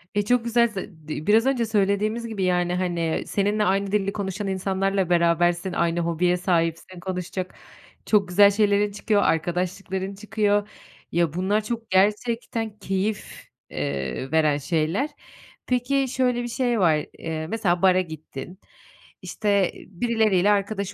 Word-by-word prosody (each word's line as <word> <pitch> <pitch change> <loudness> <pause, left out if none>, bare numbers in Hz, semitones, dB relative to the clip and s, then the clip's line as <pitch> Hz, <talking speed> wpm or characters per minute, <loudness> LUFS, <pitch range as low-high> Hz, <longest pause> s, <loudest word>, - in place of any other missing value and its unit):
E, 205 - +3
çok 240 +3 +1
güzel. 235 0 +3
Ze 190 -7 -9
di 155 +2 -5
biraz 220 +4 +5
önce 255 -4 +1
söylediğimiz 215 +2 0
gibi, 205 -4 -3
yani, 180 -1 +1
hani, 175 -3 -1
seninle 205 +1 +1
aynı 195 +1 +1
dili 200 -1 0
konuşan 200 0 -4
insanlarla 195 0 0
berabersin, 175 +1 +2
aynı 170 0 0
hobiye 170 +1 +1
sahipsin, 175 0 -1
konuşacak 180 0 -5 0.5
çok 205 -3 +3
güzel 200 +3 +6
şeylerin 205 0 +2
çıkıyor, 205 0 +1
arkadaşlıkların 185 +3 -1
çıkıyor. 205 0 0 0.4
Ya, 170 -3 +1
bunlar 200 +4 0
çok 230 0 -5
gerçekten 220 +2 0
keyif, 195 +2 -3 0.2
eee, 70 - -3
veren 155 -2 +3
şeyler. 160 - -1 0.6
Peki, 260 +2 +1
şöyle 250 -2 0
bir - - -3
şey 240 -1 0
var, 155 -4 +3
eee, 160 -1 -4
mesela 180 -4 0
bara 185 -1 +5
gittin, 160 +1 -9 0.6
işte, 200 -3 0
birileriyle 210 -1 +1
arkadaş 200 -1 -1
195 Hz, 135 wpm, -24 LUFS, 175-215 Hz, 0.6 s, güzel